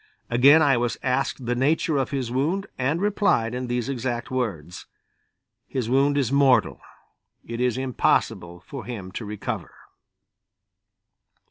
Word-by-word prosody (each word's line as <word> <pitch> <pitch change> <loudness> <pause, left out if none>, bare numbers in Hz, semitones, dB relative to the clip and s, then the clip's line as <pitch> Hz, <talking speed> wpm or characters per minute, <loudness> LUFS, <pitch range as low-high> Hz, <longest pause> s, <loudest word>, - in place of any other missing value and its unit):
Again 140 +7 +6
I 140 -4 +4
was 120 0 -1
asked 130 0 -1
the 120 - 0
nature 145 +4 +1
of 135 - 0
his 130 -4 -3
wound 160 +10 0
and 140 +6 0
replied 195 - +1
in 125 0 -3
these 120 -1 -2
exact 125 -2 -3
words: 95 - -4 0.8
"His 125 -3 -3
wound 140 +2 +3
is 135 -3 0
mortal; 140 -2 +3 0.6
it 115 +1 -5
is 125 -1 +1
impossible 90 -8 0
for 135 -3 -7
him 100 -7 -7
to 105 - -6
recover." 105 0 -5
125 Hz, 135 wpm, -24 LUFS, 120-140 Hz, 0.8 s, Again